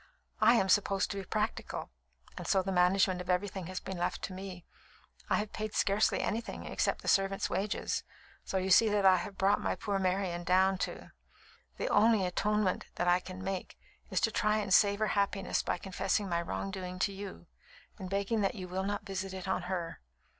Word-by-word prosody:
I 235 - +7
am 195 -4 +3
supposed 195 0 +2
to 200 - -4
be 195 - -5
practical, 215 - -3 0.4
and - - -7
so 190 -1 +3
the 195 - -2
management 185 0 +3
of 180 - -9
everything 185 -1 -1
has 185 0 -4
been 190 -2 -6
left 175 - -2
to 190 - -4
me. 185 -2 -8 0.6
I - - +3
have 210 0 -2
paid 215 0 -4
scarcely 205 +2 +2
anything, 225 +2 -3
except - - -1
the - - -8
servants' 195 0 +2
wages, 200 +2 -1 0.4
so 190 - -2
you 190 0 -1
see 220 +4 +7
what 205 -1 +1
I 185 -1 +7
have 190 +3 -6
brought 195 +1 +3
my - - 0
poor 200 -2 -2
Marian 185 -2 0
down 185 +2 +3
to. - - -11 0.7
The - - -2
only 215 -2 +4
atonement 205 +1 0
I 175 0 +3
can 185 0 -9
make 190 -1 -4 0.3
is - - +1
to - - +2
try 210 0 +2
and 205 -3 0
save 200 +1 +5
her 215 0 +1
happiness 200 -1 0
by - - -1
confessing 195 +2 -1
my 170 -2 0
wrongdoing 185 +1 -4
to 195 +2 0
you 195 0 -8 0.5
and 185 -2 -6
begging 200 +3 0
that 195 - 0
you 185 -3 -6
will 185 +1 -2
not 205 +1 -3
visit 195 0 -4
it 190 0 -6
on 185 - 0
her." 175 - -3
195 Hz, 195 wpm, -32 LUFS, 185-205 Hz, 0.7 s, I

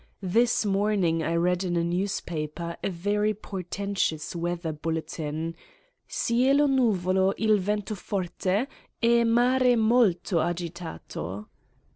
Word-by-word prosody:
This 230 +5 +2
morning 195 -5 +1
I 165 +1 -1
read 180 +2 +1
in 175 -2 -1
a 170 - +1
newspaper 170 -2 -3
a - - 0
very 205 +4 0
portentous 190 -5 -3
weather 170 -1 -2
bulletin: 160 0 -4 0.5
cielo 265 +5 +2
nuvolo 195 -8 +2
il 215 -1 +3
vento 210 +2 -2
forte 195 +3 -1 0.3
e 235 0 +4
mare 245 +2 +4
molto 220 -7 +3
agitato. 165 - -4
185 Hz, 105 wpm, -27 LUFS, 170-215 Hz, 0.5 s, e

